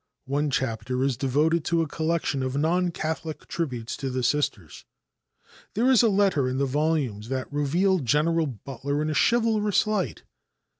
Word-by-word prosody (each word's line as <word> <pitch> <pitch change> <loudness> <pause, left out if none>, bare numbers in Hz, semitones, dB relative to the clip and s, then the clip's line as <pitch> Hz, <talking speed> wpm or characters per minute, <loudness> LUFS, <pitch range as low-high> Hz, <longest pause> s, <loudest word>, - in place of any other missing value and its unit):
One 145 +2 0
chapter 125 -1 -1
is 135 -2 +1
devoted 150 +6 +1
to 170 -1 +2
a - - -4
collection 160 -2 -1
of 130 +1 -2
non 175 +4 +2
Catholic 160 -1 -4
tributes 125 -9 -3
to 135 - -3
the 130 0 -2
Sisters. 120 - -1 0.9
There 245 +5 +3
is 255 - +6
a 230 - +4
letter 190 -10 +2
in 130 - -2
the 140 - +1
volume 145 -6 0
that 130 +1 -4
reveals 170 +6 +2
General 155 +5 +2
Butler 135 +4 -4
in 155 - -1
a - - -1
chivalrous 220 +1 +2
light. 210 -4 -2
150 Hz, 160 wpm, -26 LUFS, 130-170 Hz, 0.9 s, is